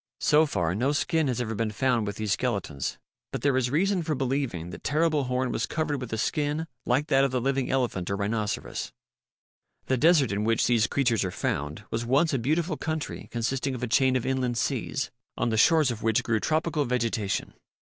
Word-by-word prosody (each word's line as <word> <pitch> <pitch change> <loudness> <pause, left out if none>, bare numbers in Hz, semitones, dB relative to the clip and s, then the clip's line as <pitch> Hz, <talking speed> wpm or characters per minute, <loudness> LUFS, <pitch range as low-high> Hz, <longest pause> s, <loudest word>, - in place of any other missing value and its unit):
So 155 +1 +4
far 90 - 0
no 130 +9 +1
skin 160 +1 +1
has 125 -3 -1
ever 115 -2 -2
been 110 +1 -1
found 115 +1 +1
with 100 - -3
these 105 -2 -3
skeletons, 100 - -2 0.3
but - - -4
there 140 -2 +3
is 130 -2 +1
reason 185 +6 +1
for 155 -2 -1
believing 130 - -2
that - - -10
Terrible 155 -1 +1
Horn 125 0 -1
was 115 - -1
covered 150 -4 -2
with 125 - -6
a 110 - -1
skin 150 +6 -1 0.2
like 130 +4 +2
that 135 -2 +3
of 135 - +3
the 130 0 0
living 135 +1 0
elephant 120 -9 -1
or 100 - 0
rhinoceros. 105 +1 -2 0.9
The 130 - +1
desert 150 -4 +4
in 100 +1 -1
which 115 +1 +2
these 115 -2 +3
creatures 120 -6 +1
are 95 - -1
found 75 0 -3
was 115 +1 -1
once 140 +7 +2
a 135 - +1
beautiful 155 +6 0
country 155 -3 -4
consisting 130 +3 -1
of 125 - -6
a - - 0
chain 130 +2 +3
of 125 - 0
inland 130 -2 0
seas, 135 +3 -1 0.3
on - - 0
the 110 - 0
shores 155 +2 +5
of 115 -2 -6
which 110 -1 +2
grew 110 -1 +1
tropical 155 +2 0
vegetation. 115 -5 -1
125 Hz, 205 wpm, -27 LUFS, 110-145 Hz, 0.9 s, shores